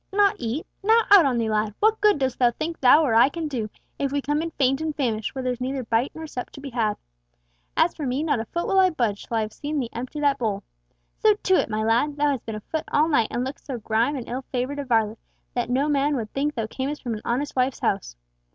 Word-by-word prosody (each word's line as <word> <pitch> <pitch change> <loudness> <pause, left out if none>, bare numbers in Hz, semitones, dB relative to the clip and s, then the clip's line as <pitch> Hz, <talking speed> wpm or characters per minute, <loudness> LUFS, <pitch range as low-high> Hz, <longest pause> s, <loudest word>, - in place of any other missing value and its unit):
"Not 400 0 +3
eat! 245 +6 -3 0.2
Now 445 +3 +5
out 380 -8 +8
on 250 -3 0
thee, 230 -1 0
lad! 210 -1 0
what 435 0 +3
good 420 -3 +5
dost 265 -3 -1
thou 245 -2 +5
think 310 +7 -5
thou 275 +5 +7
or 260 -7 +1
I 230 +4 +6
can 330 0 -4
do 235 -7 -3 0.3
if 275 -1 0
we 285 - 0
come 295 +2 -1
in 330 - -3
faint 270 -2 +1
and 315 -1 -2
famished, 225 -4 -2
where 265 - -3
there's 250 -1 -2
neither 260 +1 -2
bite 230 +3 +1
nor 320 0 -6
sup 255 -5 -6
to - - -10
be 275 -1 -7
had? 220 -3 0 0.8
As - - +4
for 295 - -4
me, 260 +4 -1
not 295 -6 +1
a 225 - -3
foot 340 +9 -3
will 385 - +3
I 375 -1 +6
budge, 235 - -2
till 230 - -1
I - - +2
have 215 0 -4
seen 295 0 -3
thee 240 -4 -3
empty 255 +5 -5
that 285 -1 +2
bowl. 210 -4 -1 0.6
So 430 -1 +5
to 380 -2 0
it, - - +3
my 215 0 -1
lad! 240 +7 +1
Thou 295 0 +2
hast 265 -5 -4
been 220 - -3
afoot 305 +9 -4
all 305 +2 +3
night, 235 -8 +3
and 245 +1 -2
lookst 265 - -8
so 265 -3 -3
grimed 230 +5 0
and 245 - -6
ill 255 +2 -3
favoured 260 +3 -2
a 285 - -3
varlet 225 -3 +1 0.3
that 245 -1 -1
no 265 +4 +1
man 290 0 +2
would 220 -5 -4
think 290 +2 -1
thou 225 - -1
camest 270 +6 -4
from 240 -3 -2
an 215 - -5
honest 265 +5 -2
wife's 255 0 0
house. 195 - -1
265 Hz, 265 wpm, -24 LUFS, 230-295 Hz, 0.8 s, out